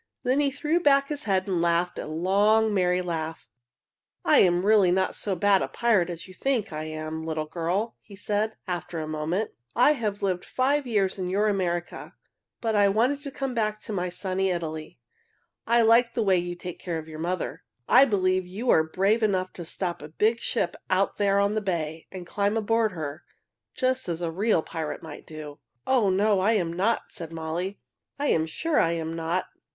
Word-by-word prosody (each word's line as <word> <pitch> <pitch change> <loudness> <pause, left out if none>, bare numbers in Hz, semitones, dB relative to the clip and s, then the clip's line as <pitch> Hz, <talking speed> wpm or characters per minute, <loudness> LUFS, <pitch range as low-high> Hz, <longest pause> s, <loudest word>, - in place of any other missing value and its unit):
Then 255 +2 +2
he 285 -1 +3
threw 300 +5 0
back 280 -3 +4
his 295 -1 -4
head 190 -2 +1
and 180 -3 0
laughed 170 +1 +1
a - - -5
loud, 200 +7 +3
merry 180 -2 +2
laugh. 160 -2 -4 0.7
"I - - +6
really 185 +2 +4
am 175 - +3
not 190 0 0
so 200 -2 -1
bad 200 0 +3
a - - -1
pirate 210 -7 +2
as 170 0 -6
you 185 - -12
think 230 -4 -1
I 155 0 -4
am, 155 0 -5
little 160 -1 -3
girl," 175 +8 -2
he 200 - -14
said, 210 +2 -1
after 175 -2 -4
a 155 - -4
moment. 155 +7 -2 0.2
"I 250 +5 +6
have 215 -8 -2
lived 185 -2 0
five 275 +2 0
years 200 -4 +1
in 180 -1 -2
your 205 +3 +2
America, 175 -4 -2 0.5
but 225 -2 0
I 205 -1 +5
wanted 245 +8 +1
to 285 - -5
come 270 -1 -4
back 215 -2 -1
to 215 - -6
my 180 -2 -1
sunny 185 +2 -1
Italy. 160 -3 -4 0.7
I 235 +1 +4
like 235 +1 +4
the 230 - +1
way 190 -3 +3
you 175 0 -4
take 175 0 -8
care 175 -3 -3
of 160 0 -7
your 155 -1 -9
mother. 175 +2 -3 0.3
I 265 +2 +7
believe 185 -5 +1
you 215 +7 -1
are 160 - +6
brave 195 +8 +1
enough 185 -4 0
to 175 - -8
stop 175 0 -4
a 150 - -7
big 220 +8 +1
ship 200 -7 -1
out 190 +1 +1
there 200 -1 +2
on 200 +1 +2
the 215 - 0
bay 165 -5 -3
and 185 -2 -7
climb 200 +4 0
aboard 225 -1 +1
her, 155 -2 -6 0.5
just 255 -5 0
as 165 -1 -2
a 165 - -1
real 195 -1 +1
pirate 155 -2 -5
might 155 -2 -10
do." 150 -1 -9 0.3
"Oh, 245 -7 +3
no, 200 +1 +3
I 205 +4 +3
am 175 -6 0
not!" 200 +7 0
said 165 -6 -8
Molly. 165 +4 -4 0.4
"I 290 - -2
am 160 0 +2
sure 310 - 0
I 165 -1 +3
am 165 -1 -3
not!" 165 +3 -1
190 Hz, 200 wpm, -26 LUFS, 170-220 Hz, 0.7 s, I